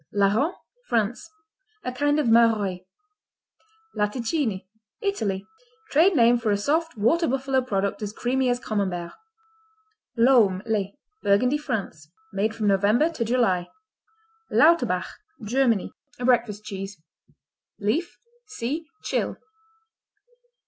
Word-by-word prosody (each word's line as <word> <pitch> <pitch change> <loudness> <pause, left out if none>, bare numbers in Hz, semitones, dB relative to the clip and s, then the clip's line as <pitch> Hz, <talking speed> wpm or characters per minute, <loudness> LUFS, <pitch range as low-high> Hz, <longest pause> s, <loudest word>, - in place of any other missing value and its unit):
Larron 210 - +2 0.3
France 225 0 -1 0.5
A 250 - -3
kind 290 +3 +1
of 300 - +1
Maroilles. 220 -5 +3 1.1
Latticini 220 - -1 0.3
Italy 215 - -2 0.5
Trade 335 +6 +4
name 240 -2 +5
for 225 -2 -1
a 205 - +2
soft, 315 +6 -1
water 325 +11 +2
buffalo 270 0 0
product 200 -5 -2
as 205 -1 -3
creamy 255 +3 0
as 245 0 +1
Camembert. 190 -7 -3 1.0
Laumes, 230 -6 +4
les 205 -1 -2 0.2
Burgundy, 250 +8 +2
France 175 - -4 0.2
Made 215 +3 0
from 220 - -3
November 205 - +3
to 285 -8 -2
July. 225 -7 +1 0.8
Lauterbach 335 +2 +4 0.4
Germany 235 -2 +1 0.2
Breakfast 240 -4 +1
cheese 195 -3 -7 0.8
Leaf 275 - -1 0.3
see 310 - -4 0.2
Tschil. - - -1
230 Hz, 105 wpm, -25 LUFS, 200-265 Hz, 1.1 s, name